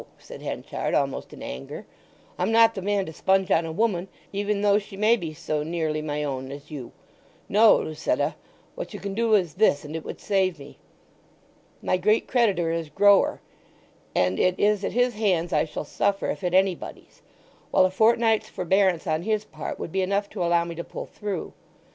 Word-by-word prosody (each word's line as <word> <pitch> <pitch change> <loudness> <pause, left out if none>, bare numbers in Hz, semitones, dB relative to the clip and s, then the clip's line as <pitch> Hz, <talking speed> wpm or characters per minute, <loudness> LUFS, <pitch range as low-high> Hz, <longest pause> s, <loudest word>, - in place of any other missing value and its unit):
said - - -12
Henchard, - - -3
almost - - -1
in - - -10
anger. 65 - -7 0.5
"I'm 185 +4 +1
not 225 0 +6
the 190 - -5
man 200 0 0
to 160 - -8
sponge 190 +3 +1
on 165 -1 +3
a - - -4
woman, 195 -1 0 0.3
even 200 0 -1
though 205 0 +4
she 200 -1 -11
may 215 +3 +4
be 170 -8 -5
so 155 0 -3
nearly 155 -1 -2
my 150 -1 -3
own 135 -2 -4
as 145 +2 -10
you. 135 -5 -7 0.6
No, 215 +2 +6
Lucetta; 155 - -1 0.4
what - - -7
you - - -6
can 200 -1 -5
do 225 +1 +3
is 175 -7 +1
this 180 -7 +2
and 150 +2 -7
it 160 - -4
would - - -7
save 190 -4 +1
me. 140 0 -13 1.0
My 185 - +1
great 210 +5 +2
creditor 200 -9 +2
is 165 -2 -3
Grower, 200 +4 +4 0.7
and 90 0 +1
it 185 0 +2
is 205 -1 +2
at - - -2
his 245 +1 +2
hands 185 -6 0
I 150 - +3
shall 155 -1 -6
suffer 200 +6 0
if - - -7
at 180 0 0
anybody's; 190 -1 -1 0.5
while 185 - +4
a 185 - +1
fortnight's 225 +2 +3
forbearance 185 -1 +1
on 155 -2 0
his 215 +2 -1
part 155 -6 -6
would - - -6
be 190 - 0
enough 200 +2 -1
to 190 -4 -3
allow 170 0 +3
me 170 - -5
to 170 +1 -5
pull - - -7
through. 205 -4 -5
185 Hz, 195 wpm, -25 LUFS, 160-205 Hz, 1.0 s, not